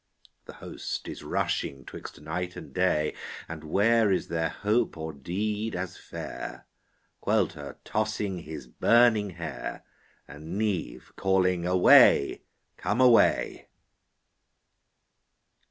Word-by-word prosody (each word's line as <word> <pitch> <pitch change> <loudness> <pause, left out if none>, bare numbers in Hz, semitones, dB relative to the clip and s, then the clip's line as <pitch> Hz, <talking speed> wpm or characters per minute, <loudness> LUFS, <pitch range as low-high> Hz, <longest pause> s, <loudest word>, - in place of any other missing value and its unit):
The - - -10
host - - -6
is - - -7
rushing 70 -2 -2
'twixt - - -10
night 90 +3 -4
and - - -10
day, 90 -5 +1 0.3
And 80 -1 -8
where 105 +6 +3
is 95 - 0
there 80 -1 0
hope 105 +4 0
or 80 0 -5
deed 105 +9 -3
as 90 0 -4
fair? - - -8 0.6
Caolte - - 0
tossing 105 -3 -2
his 80 -5 -8
burning 110 - +3
hair, 85 -4 -6 0.4
And 80 +7 -7
Niamh 100 - -3
calling 90 -2 +1
Away, 90 -5 +6 0.4
come 110 - -1
away. 125 -3 +4
90 Hz, 105 wpm, -27 LUFS, 80-105 Hz, 0.6 s, Away